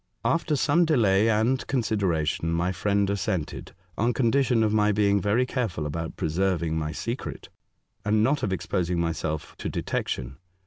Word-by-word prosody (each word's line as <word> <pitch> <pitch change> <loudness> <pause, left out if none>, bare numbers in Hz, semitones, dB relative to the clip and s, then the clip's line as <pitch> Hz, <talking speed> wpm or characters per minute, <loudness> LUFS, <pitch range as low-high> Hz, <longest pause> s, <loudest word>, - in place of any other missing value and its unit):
After 165 -2 +1
some 150 +5 +3
delay 115 - +3
and 115 +4 +1
consideration, 90 - 0
my 85 +2 0
friend 100 +2 +1
assented, 95 -7 -3 0.2
on 120 +3 +2
con 115 -1 +2
dition 130 -4 +3
of 105 -1 +1
my 105 -1 +3
being 100 -1 +2
very 105 +6 +2
careful 115 - -2
about 80 +2 -4
pre - - -2
serving 85 -1 0
my 75 -1 -2
secret, 115 - -5 0.5
and 105 +1 +2
not 140 +5 +2
of 105 - -1
exposing 90 -2 -1
myself 80 -2 -2
to - - -3
detection. 65 +1 -3
100 Hz, 160 wpm, -26 LUFS, 85-115 Hz, 0.5 s, some